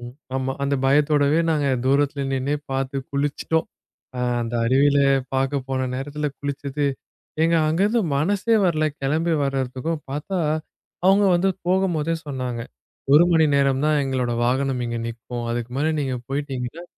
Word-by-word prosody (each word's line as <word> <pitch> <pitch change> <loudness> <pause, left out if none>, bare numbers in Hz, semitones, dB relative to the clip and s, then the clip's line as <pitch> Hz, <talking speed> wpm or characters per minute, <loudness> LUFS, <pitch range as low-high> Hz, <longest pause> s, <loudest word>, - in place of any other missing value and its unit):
ம், 120 0 -8 0.2
ஆமா. 135 0 -1
அந்த 140 0 +1
பயத்தோடவே 145 +2 +3
நாங்க 150 -3 +1 0.2
தூரத்துல 140 +1 +2
நின்னே 135 +2 0
பார்த்து 135 +1 -2
குளிச்சிட்டோம். 145 +3 -1 0.5
ஆ, - - -1 0.2
அந்த 115 0 -4
அருவியில 140 +4 +4 0.4
பாக்க 135 +1 +1
போன 130 -1 -1
நேரத்துல 145 +3 -3
குளிச்சது 145 0 -3 0.6
ஏங்க 165 +1 +3
அங்க 160 +3 0
இருந்து 225 +2 +2
மனசே 205 +9 +2
வரல 155 -4 +2 0.2
கிளம்பி 160 +5 +1
வர்றதுக்கும். 135 +3 -2
பாத்தா 150 +7 -3 0.7
அவங்க 195 +2 +5
வந்து 175 +3 +2 0.2
போகும்போதே 175 -4 +1
சொன்னாங்க, 130 -4 -4 0.5
1 150 +4 +8
மணி 160 -1 +5
நேரம்தான் 140 +2 +2
எங்களோட 130 -3 -1
வாகனம் 130 +1 0
இங்க 120 0 -3
நிற்கும், 120 +1 -6
அதுக்கு 120 0 -3
மேல 155 +3 +1
நீங்க 130 -3 -1
போயிட்டீங்கன்னா 135 +2 -4
140 Hz, 140 wpm, -23 LUFS, 130-155 Hz, 0.7 s, 1